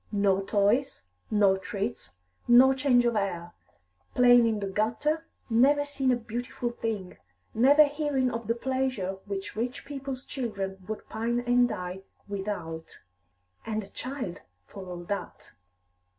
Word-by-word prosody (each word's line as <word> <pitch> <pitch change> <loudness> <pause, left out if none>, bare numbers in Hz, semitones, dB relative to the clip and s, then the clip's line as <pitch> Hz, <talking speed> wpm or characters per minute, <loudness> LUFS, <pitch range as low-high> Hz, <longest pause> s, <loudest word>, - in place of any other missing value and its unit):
No 200 -2 +2
toys, 205 +6 +1 0.3
no 200 -3 +4
treats, 190 -9 -4 0.4
no 255 +3 +7
change 260 -2 +3
of 235 -1 +2
air; 175 -4 -2 0.6
playing 245 -1 +7
in 220 -2 0
the 200 - -3
gutter, 235 - -1 0.2
never 275 +5 +4
seeing 275 -2 0
a - - +4
beautiful 240 +1 -4
thing, 215 -6 -4 0.4
never 280 +7 +7
hearing 285 -3 0
of 230 -2 -5
the 230 - +1
pleasures 255 -7 -2
which 200 0 -5
rich 245 +4 -3
people's 275 -2 -6
children 195 -7 -4
would 215 0 -6
pine 235 +2 -1
and 245 0 +3
die 180 -2 -5 0.3
without 195 -5 -5 0.6
And 215 -1 -2
a 195 - -13
child 255 -10 -5 0.2
for 190 - -10
all 175 -1 -6
that." 200 +3 -5
230 Hz, 135 wpm, -28 LUFS, 195-255 Hz, 0.6 s, no